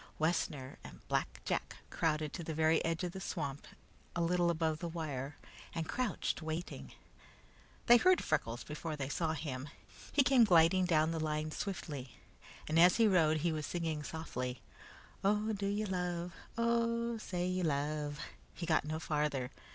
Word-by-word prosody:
Wessner 150 Hz, -5 st, -1 dB
and -, -, -12 dB
Black -, -, -1 dB
Jack -, -, -2 dB, 0.2 s
crowded 155 Hz, -2 st, 0 dB
to 170 Hz, -, -4 dB
the 160 Hz, -1 st, -4 dB
very 160 Hz, 0 st, +3 dB
edge 165 Hz, +1 st, -1 dB
of 175 Hz, -, -1 dB
the 190 Hz, -, -7 dB
swamp 145 Hz, -7 st, -4 dB, 0.5 s
a 170 Hz, -, 0 dB
little 175 Hz, 0 st, +2 dB
above 160 Hz, -2 st, 0 dB
the 170 Hz, -, -3 dB
wire, 145 Hz, -4 st, -4 dB, 0.4 s
and 165 Hz, -1 st, -2 dB
crouched, 240 Hz, -3 st, -1 dB
waiting. 160 Hz, +2 st, -5 dB, 0.9 s
They 240 Hz, -, +9 dB
heard 365 Hz, +7 st, +4 dB
Freckles 115 Hz, +1 st, -1 dB
before 155 Hz, +1 st, -5 dB
they 140 Hz, -2 st, -3 dB
saw 160 Hz, +2 st, 0 dB
him. 145 Hz, -3 st, -4 dB, 0.4 s
He 280 Hz, -, +5 dB
came 260 Hz, -2 st, +6 dB
gliding 180 Hz, -1 st, +5 dB
down 160 Hz, -2 st, +3 dB
the 165 Hz, -, -2 dB
line 155 Hz, 0 st, -1 dB
swiftly, 150 Hz, -, -5 dB, 0.5 s
and 155 Hz, +2 st, +3 dB
as 175 Hz, +2 st, +7 dB
he 225 Hz, -1 st, +5 dB
rode 160 Hz, -5 st, +4 dB
he 170 Hz, +1 st, +2 dB
was 155 Hz, -2 st, -3 dB
singing 165 Hz, -3 st, -2 dB
softly: 130 Hz, -6 st, -4 dB, 0.6 s
"Oh, 210 Hz, +2 st, +2 dB
do 200 Hz, -1 st, -2 dB
you 205 Hz, +2 st, 0 dB
love, 180 Hz, -2 st, -2 dB, 0.2 s
Oh, 235 Hz, 0 st, +1 dB
say 180 Hz, -4 st, -2 dB
you 185 Hz, 0 st, 0 dB
love 150 Hz, -1 st, -1 dB, 0.2 s
" -, -, -29 dB
He 170 Hz, -, -4 dB
got 160 Hz, -3 st, +2 dB
no 155 Hz, +1 st, -2 dB
farther. 150 Hz, -5 st, -1 dB
165 Hz, 165 wpm, -34 LUFS, 150-185 Hz, 0.9 s, They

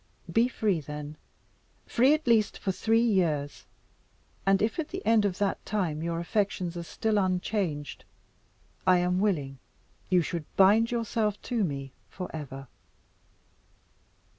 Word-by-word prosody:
Be 230 Hz, +2 st, +4 dB
free, 210 Hz, -7 st, 0 dB
then 150 Hz, 0 st, -7 dB, 0.7 s
free 260 Hz, +5 st, +4 dB
at 310 Hz, -, -6 dB
least 225 Hz, -4 st, +3 dB
for 195 Hz, -, -1 dB
three 225 Hz, +4 st, +2 dB
years 165 Hz, -10 st, 0 dB, 0.8 s
and 195 Hz, 0 st, +5 dB
if 220 Hz, +8 st, 0 dB
at 310 Hz, -, -1 dB
the 375 Hz, +1 st, -7 dB
end 220 Hz, -2 st, +4 dB
of 190 Hz, -2 st, -1 dB
that 200 Hz, -2 st, -1 dB
time 175 Hz, -8 st, -2 dB
your 170 Hz, 0 st, -2 dB
affections 180 Hz, -1 st, -1 dB
are 170 Hz, -, -4 dB
still 210 Hz, +5 st, -1 dB
unchanged, 180 Hz, -5 st, -2 dB, 0.8 s
I 185 Hz, -1 st, +6 dB
am 180 Hz, +1 st, +1 dB
willing 145 Hz, -10 st, -1 dB, 0.5 s
you 180 Hz, -2 st, +4 dB
should 165 Hz, -1 st, -4 dB
bind 210 Hz, +4 st, +5 dB
yourself 225 Hz, -3 st, -1 dB
to 235 Hz, -4 st, 0 dB
me 140 Hz, -5 st, -3 dB, 0.2 s
for 180 Hz, -3 st, -7 dB
ever." 135 Hz, -3 st, -7 dB
190 Hz, 140 wpm, -28 LUFS, 165-220 Hz, 0.8 s, I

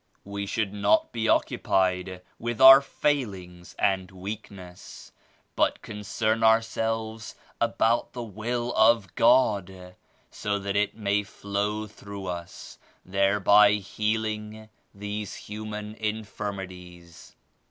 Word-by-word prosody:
"We 100 Hz, 0 st, -5 dB
should 105 Hz, -1 st, -2 dB
not 105 Hz, +1 st, +2 dB
be 115 Hz, -1 st, -1 dB
occupied 90 Hz, -1 st, 0 dB, 0.2 s
with 120 Hz, 0 st, -4 dB
our 135 Hz, +1 st, +10 dB
fail 140 Hz, -6 st, -1 dB
ings* 90 Hz, -1 st, -13 dB
and 95 Hz, -1 st, 0 dB
weakness 95 Hz, -1 st, -9 dB, 0.4 s
but -, -, +1 dB
concern 110 Hz, +1 st, -2 dB
ourselves 110 Hz, -1 st, 0 dB, 0.3 s
about 115 Hz, 0 st, +1 dB
the 120 Hz, -, -5 dB
Will 120 Hz, +3 st, -3 dB
of 110 Hz, -4 st, +3 dB
God 100 Hz, -7 st, +2 dB, 0.4 s
so 100 Hz, -1 st, -2 dB
that 100 Hz, 0 st, -4 dB
It 105 Hz, +1 st, 0 dB
may 105 Hz, -1 st, +1 dB
flow 105 Hz, +1 st, -3 dB
through 100 Hz, -2 st, -9 dB
us, 85 Hz, -1 st, -7 dB, 0.3 s
thereby 100 Hz, +2 st, +4 dB
healing 110 Hz, +1 st, -3 dB, 0.2 s
these 105 Hz, +1 st, -6 dB
human 105 Hz, 0 st, -7 dB
infirmities." 95 Hz, -6 st, -7 dB
105 Hz, 105 wpm, -26 LUFS, 95-110 Hz, 0.4 s, our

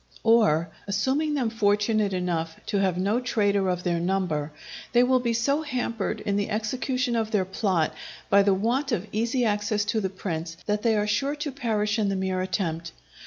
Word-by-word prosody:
Or, 205 Hz, -8 st, +4 dB, 0.2 s
assuming 265 Hz, +10 st, 0 dB
them 245 Hz, -5 st, 0 dB
fortunate 210 Hz, -1 st, +2 dB
enough 170 Hz, -3 st, -2 dB
to 205 Hz, -, -1 dB
have 190 Hz, -3 st, +1 dB
no 200 Hz, +6 st, +1 dB
traitor 205 Hz, -6 st, +1 dB
of 180 Hz, 0 st, -1 dB
their 175 Hz, -2 st, 0 dB
number, 170 Hz, -5 st, -1 dB, 0.4 s
they 240 Hz, 0 st, +6 dB
will 255 Hz, 0 st, +3 dB
be 240 Hz, -1 st, 0 dB
so 275 Hz, +6 st, +1 dB
hampered 230 Hz, -7 st, -2 dB
in 200 Hz, 0 st, -1 dB
the 205 Hz, -, -1 dB
execution 245 Hz, +3 st, -1 dB
of 225 Hz, -1 st, 0 dB
their 205 Hz, -4 st, +1 dB
plot 185 Hz, -4 st, 0 dB, 0.3 s
by 200 Hz, 0 st, +5 dB
the 200 Hz, -1 st, +3 dB
want 245 Hz, +8 st, 0 dB
of 210 Hz, -4 st, -1 dB
easy 235 Hz, +3 st, 0 dB
access 210 Hz, 0 st, 0 dB
to 220 Hz, +1 st, 0 dB
the 190 Hz, -, -1 dB
prince, 165 Hz, -3 st, -5 dB
that 210 Hz, 0 st, 0 dB
they 225 Hz, -1 st, +2 dB
are 210 Hz, -, +1 dB
sure 270 Hz, +8 st, 0 dB
to 295 Hz, -1 st, -4 dB
perish 220 Hz, -5 st, -1 dB
in 205 Hz, -2 st, +1 dB
the 195 Hz, -, 0 dB
mere 190 Hz, -1 st, -1 dB
attempt. 170 Hz, -3 st, -2 dB
210 Hz, 190 wpm, -26 LUFS, 190-235 Hz, 0.4 s, they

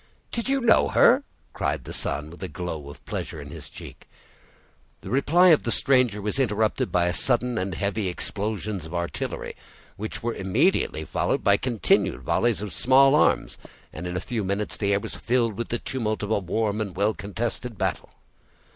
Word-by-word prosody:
"Did 235 Hz, +2 st, -2 dB
you 275 Hz, 0 st, +2 dB
know 235 Hz, -2 st, +5 dB
her?" -, -, +5 dB, 0.3 s
cried 70 Hz, -1 st, -1 dB
the -, -, -8 dB
son, 75 Hz, +2 st, -2 dB
with 85 Hz, -, -12 dB
a 95 Hz, -, -3 dB
glow 80 Hz, -6 st, -5 dB
of 70 Hz, -, -13 dB
pleasure -, -, -5 dB
on -, -, -9 dB
his -, -, -9 dB
cheek. -, -, -12 dB, 0.9 s
The -, -, -8 dB
reply 160 Hz, +8 st, +5 dB
of 160 Hz, -, +6 dB
the 120 Hz, -, -2 dB
stranger 125 Hz, -4 st, +2 dB
was 105 Hz, +6 st, -1 dB
interrupted 110 Hz, -4 st, +1 dB
by 90 Hz, 0 st, +2 dB
sudden 120 Hz, +2 st, +1 dB
and 95 Hz, -1 st, -3 dB
heavy 100 Hz, +2 st, -1 dB
explosions 100 Hz, 0 st, -3 dB
of 85 Hz, -, -7 dB
artillery, 85 Hz, 0 st, -4 dB, 0.4 s
which 110 Hz, +3 st, -5 dB
were 120 Hz, 0 st, -1 dB
immediately 95 Hz, -, +1 dB
followed -, -, -1 dB
by 100 Hz, 0 st, +5 dB
continued 115 Hz, -, +1 dB
volleys 115 Hz, -, +1 dB
of 100 Hz, -5 st, -6 dB
small 135 Hz, -, +5 dB
arms, 150 Hz, -, +2 dB, 0.3 s
and 85 Hz, +3 st, -6 dB
in 90 Hz, 0 st, -3 dB
a -, -, -2 dB
few 115 Hz, -4 st, -3 dB
minutes 100 Hz, +2 st, -2 dB
the 100 Hz, -1 st, 0 dB
air 100 Hz, -, +3 dB
was 110 Hz, +1 st, -6 dB
filled 120 Hz, -3 st, 0 dB
with 115 Hz, -, -3 dB
the 120 Hz, -, 0 dB
tumult 110 Hz, -4 st, -3 dB
of 105 Hz, -, -3 dB
a 110 Hz, -, +3 dB
warm 105 Hz, +3 st, -1 dB
and 100 Hz, -4 st, -4 dB
well 100 Hz, +3 st, +2 dB
contested 115 Hz, +3 st, -4 dB
battle. -, -, -2 dB
105 Hz, 185 wpm, -25 LUFS, 95-120 Hz, 0.9 s, of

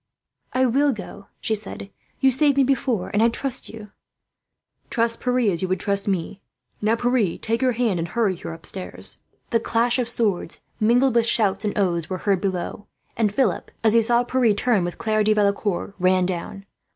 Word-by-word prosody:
"I 260 Hz, 0 st, +2 dB
will 275 Hz, +3 st, +2 dB
go," 200 Hz, -1 st, -10 dB
she 220 Hz, -, -1 dB
said. 205 Hz, -1 st, -4 dB, 0.3 s
"You 265 Hz, -1 st, +5 dB
saved 280 Hz, +2 st, +2 dB
me 275 Hz, -, +5 dB
before, 260 Hz, -6 st, 0 dB
and 205 Hz, -, +2 dB
I 230 Hz, -, +5 dB
trust 260 Hz, +2 st, 0 dB
you." 210 Hz, -2 st, -11 dB, 1.0 s
"Trust 230 Hz, -1 st, 0 dB
Pierre 250 Hz, 0 st, 0 dB
as 170 Hz, -, -2 dB
you 185 Hz, -, -1 dB
would 185 Hz, 0 st, -1 dB
trust 200 Hz, +1 st, 0 dB
me," 195 Hz, -2 st, +2 dB
he 165 Hz, -, -7 dB
said. 205 Hz, +1 st, -14 dB
"Now, 225 Hz, -, +3 dB
Pierre, 240 Hz, -6 st, 0 dB
take 230 Hz, +2 st, -2 dB
her 255 Hz, -1 st, +2 dB
hand 230 Hz, -6 st, 0 dB
and 165 Hz, -, -2 dB
hurry 200 Hz, +1 st, 0 dB
her -, -, -7 dB
upstairs." 165 Hz, +3 st, -2 dB, 0.3 s
The 230 Hz, -, +3 dB
clash 235 Hz, +2 st, +1 dB
of 240 Hz, -2 st, +1 dB
swords, 210 Hz, -8 st, -1 dB, 0.2 s
mingled 240 Hz, +4 st, +3 dB
with 235 Hz, -1 st, +2 dB
shouts 200 Hz, -3 st, +2 dB
and 205 Hz, -, -2 dB
oaths, 175 Hz, -5 st, 0 dB
were 185 Hz, -, -2 dB
heard 195 Hz, -1 st, 0 dB
below; 195 Hz, +1 st, -3 dB, 0.3 s
and 215 Hz, -3 st, +1 dB
Philip, 260 Hz, +5 st, 0 dB
as 220 Hz, -1 st, +4 dB
he 230 Hz, -, +5 dB
saw 240 Hz, +2 st, +2 dB
Pierre 245 Hz, -3 st, +2 dB
turn 215 Hz, -3 st, +1 dB
with 175 Hz, 0 st, -4 dB
Claire 215 Hz, -1 st, +1 dB
de 215 Hz, +1 st, +3 dB
Valecourt, 200 Hz, -2 st, 0 dB
ran 185 Hz, 0 st, +3 dB
down. 185 Hz, +2 st, -5 dB
215 Hz, 200 wpm, -23 LUFS, 195-240 Hz, 1.0 s, You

